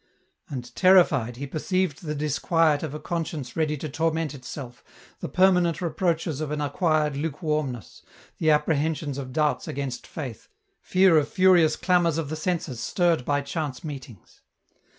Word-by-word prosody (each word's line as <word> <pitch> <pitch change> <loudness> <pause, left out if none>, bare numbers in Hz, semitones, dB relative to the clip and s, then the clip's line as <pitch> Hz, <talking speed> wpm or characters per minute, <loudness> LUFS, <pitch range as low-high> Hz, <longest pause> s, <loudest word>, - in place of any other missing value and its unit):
" - - -43
And 125 -3 -6
terrified, 150 -11 +4
he 140 - -4
perceived 165 +3 -1
the 150 -2 -3
disquiet 150 +1 +1
of 150 -2 -5
a - - -5
conscience 160 -7 -4
ready 155 -2 0
to 155 - -5
torment 160 0 -1
itself, 130 -2 -9 0.4
the - - -5
permanent 180 -3 +3
reproaches 165 -3 -1
of 155 - -3
an 150 0 -2
acquired 150 0 +1
lukewarmness, 150 - -3 0.4
the 160 - +2
apprehensions 150 -1 +1
of 130 -2 -6
doubts 150 +2 0
against 135 -3 -4
Faith, 130 -8 -7 0.3
fear 185 -3 +4
of 145 - -2
furious 180 -4 +4
clamours 175 -3 +2
of 160 -4 -3
the 155 - -3
senses 155 -6 -2
stirred 170 +3 +1
by 145 0 +1
chance 140 -2 -4
meetings. 130 - -9
155 Hz, 150 wpm, -25 LUFS, 140-165 Hz, 0.4 s, terrified